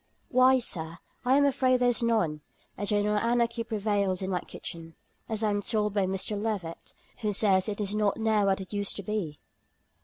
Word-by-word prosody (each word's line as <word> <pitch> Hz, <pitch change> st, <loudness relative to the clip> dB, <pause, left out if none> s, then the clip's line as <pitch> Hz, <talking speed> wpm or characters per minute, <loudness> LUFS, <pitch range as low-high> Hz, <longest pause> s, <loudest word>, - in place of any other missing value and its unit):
"Why, 255 Hz, +1 st, +5 dB
Sir, 165 Hz, -9 st, -3 dB, 0.3 s
I 260 Hz, +2 st, +4 dB
am 285 Hz, -, +4 dB
afraid 255 Hz, -2 st, +3 dB
there 245 Hz, 0 st, +4 dB
is 245 Hz, -, 0 dB
none; 215 Hz, -11 st, +1 dB, 0.3 s
a 205 Hz, -, -4 dB
general 210 Hz, +1 st, +2 dB
anarchy 235 Hz, 0 st, +1 dB
prevails 205 Hz, -4 st, 0 dB
in 190 Hz, -, -2 dB
my 180 Hz, -, +1 dB
kitchen, 165 Hz, -2 st, -8 dB, 0.3 s
as 220 Hz, -1 st, -2 dB
I 215 Hz, -, +2 dB
am 205 Hz, 0 st, 0 dB
told 210 Hz, -1 st, 0 dB
by 200 Hz, -2 st, +1 dB
Mr. 190 Hz, +2 st, -2 dB
Levett, 200 Hz, -7 st, -4 dB, 0.3 s
who 215 Hz, -3 st, -1 dB
says 195 Hz, -1 st, +3 dB
it 205 Hz, -, -4 dB
is 205 Hz, -1 st, -2 dB
not 210 Hz, -1 st, +1 dB
now 220 Hz, -2 st, +2 dB
what 195 Hz, 0 st, +2 dB
it 190 Hz, -, -9 dB
used 205 Hz, -1 st, -1 dB
to 200 Hz, -, -5 dB
be." 185 Hz, -7 st, -3 dB
210 Hz, 195 wpm, -28 LUFS, 190-230 Hz, 0.3 s, Why